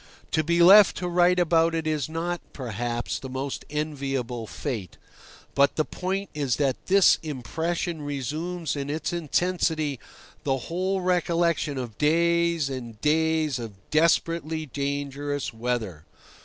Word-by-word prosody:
To 155 - +2
be 170 +2 +3
left 200 +3 +8
to 180 - -2
write 175 +1 +3
about 165 -1 +3
it 160 -1 -2
is 155 -4 -1
not, 170 +2 -3
perhaps, 120 -1 -3
the 130 - -7
most 130 +1 -4
enviable 135 -6 -3
fate; 110 - -5 0.6
but 140 0 +3
the 155 - +1
point 190 +1 -3
is 140 -5 0
that 135 -3 -1
this 195 0 +5
impression 160 - -3
resumes 150 +4 -3
in 140 0 -4
its 155 +2 -2
intensity 160 -3 0 0.4
the 135 -3 0
whole 185 +8 -2
recollection 170 -4 +1
of 120 -5 -6
days 170 0 +2
and 120 -5 -6
days 155 -2 +2
of 115 -3 -6 0.2
desperately 160 0 +2
dangerous 140 0 -3
weather. 110 -9 -3
155 Hz, 130 wpm, -26 LUFS, 135-170 Hz, 0.6 s, left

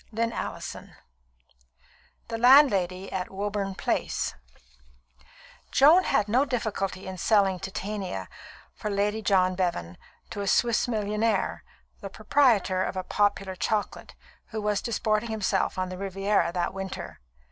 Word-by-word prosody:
CHAPTER 230 +1 -2 0.2
V - - -17 1.4
The 225 -1 -3
Landlady 200 -8 +5
at 185 -1 -3
Woburn 200 0 -3
Place - - -1 1.4
Joan 320 +7 +6
had 245 -7 +1
no 245 +6 +3
difficulty 210 -8 -3
in 190 -1 -7
selling 195 -2 +3
Titania 190 - -5 0.5
for 210 - -5
Lady 205 +2 0
John 185 -3 +3
Bevan, 170 - -2 0.3
to 205 - -4
a 200 - -3
Swiss 235 +3 +2
millionaire, 210 -1 -1 0.4
the 195 - -7
proprietor 215 -4 +2
of 190 - -4
a 185 - -2
popular 195 -1 0
chocolate, 210 +2 -3 0.3
who 220 - -5
was 210 -1 0
disporting 220 -1 -1
himself 200 -4 -1
on 185 0 -2
the 185 0 -7
Riviera 195 -1 0
that 175 0 -2
winter. 195 0 -6
200 Hz, 125 wpm, -27 LUFS, 190-220 Hz, 1.4 s, Joan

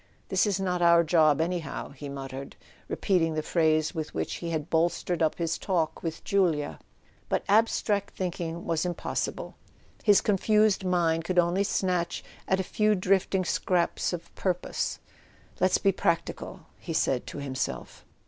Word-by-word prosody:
"This 190 +2 +2
is 200 -2 0
not 180 -2 -1
our 170 0 +6
job 155 -3 +4
anyhow," 165 -3 -2
he 140 0 -9
muttered, 135 0 -7 0.3
repeating 165 -5 +1
the 155 - -1
phrase 155 -1 +2
with 160 -3 -5
which 80 0 -2
he 170 - -5
had 160 -2 -2
bolstered 170 +1 0
up 160 -1 +2
his 165 -1 -1
talk 170 -5 -1
with 165 -2 -5
Julia. 160 - +1 0.5
But - - 0
abstract 205 -1 +2
thinking 170 -2 -4
was 165 -2 0
impossible: 175 -2 -3 0.5
his 205 -3 +6
confused 210 0 +2
mind 170 -3 +1
could 180 +2 -3
only 175 +3 +3
snatch 180 -3 -1 0.2
at 190 - +2
a - - 0
few 210 +3 +2
drifting 190 0 +1
scraps 175 0 0
of 170 -1 -6
pur¬ 180 -2 0
pose. - - -3 0.6
"Let's 185 0 +3
be 195 - +3
practical," 170 -3 -2 0.2
he 165 - -5
said 135 -5 0
to - - -7
himself. 135 -2 -4
175 Hz, 155 wpm, -28 LUFS, 160-190 Hz, 0.6 s, our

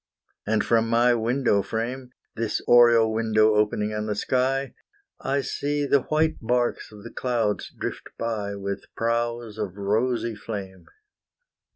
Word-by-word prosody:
And 110 -1 +2
from 115 -1 +2
my 120 +1 +4
window 120 -2 +1
frame, 120 +5 -4 0.3
This 115 -1 -1
oriel 120 -2 +6
window 110 -1 +3
opening 105 0 +1
on 105 0 -3
the 105 - -1
sky, 130 +3 0 0.5
I 140 +1 0
see 145 +1 -2
the 140 -1 +3
white 155 +3 +1
barques 120 0 0
of 105 -1 -13
the 120 - -9
clouds 115 -5 -1
drift - - -6
by, 105 -3 -3
With 100 0 -5
prows 115 -1 -2
of 100 -2 -4
rosy 115 +4 0
flame. 100 -4 -7
115 Hz, 140 wpm, -25 LUFS, 105-125 Hz, 0.5 s, oriel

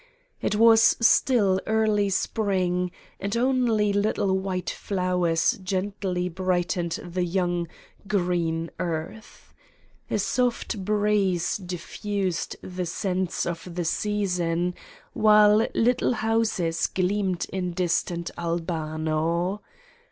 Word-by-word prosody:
It - - 0
was 225 +1 +6
still 225 -5 +4
early 215 -2 +2
Sprmg 185 -3 0 0.3
and 200 +3 -2
only 235 -5 +2
little 200 -1 +1
white 190 -1 -2
flowers 180 -4 0
gently 185 -1 -2
brightened 175 -1 -1
the 175 +1 -3
young, 175 -1 -1 0.4
green 175 -4 0
earth. 170 +6 -5 0.6
A - - 0
soft 235 -1 -1
breeze 205 -3 +1
diffused 185 0 -3
the 180 -1 -4
scents 185 +1 -2
of 170 0 -5
the 175 -1 -2
season, 180 -3 0 0.4
while 210 0 +5
little 245 +2 +2
houses 220 -7 0
gleamed 185 -1 0
in 180 -2 -2
distant 170 -1 -1
Albano. 165 +2 -1
185 Hz, 95 wpm, -25 LUFS, 175-210 Hz, 0.6 s, was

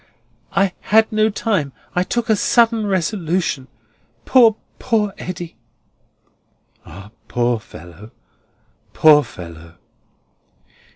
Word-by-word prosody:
"I 195 -2 +2
had 220 +1 +2
no 215 0 +2
time. 200 - -1 0.2
I 180 - +1
took 235 +5 -2
a 220 - +3
sudden 230 0 +2
resolution. 175 -6 -1 0.6
Poor, 230 -4 +5 0.2
poor 215 -5 0
Eddy!" 175 -2 -7 1.3
"Ah, 100 +5 -12 0.2
poor 120 -1 0
fellow, 90 +2 -13 0.8
poor 150 -2 +6
fellow!" 85 - -12
180 Hz, 95 wpm, -19 LUFS, -, 1.3 s, poor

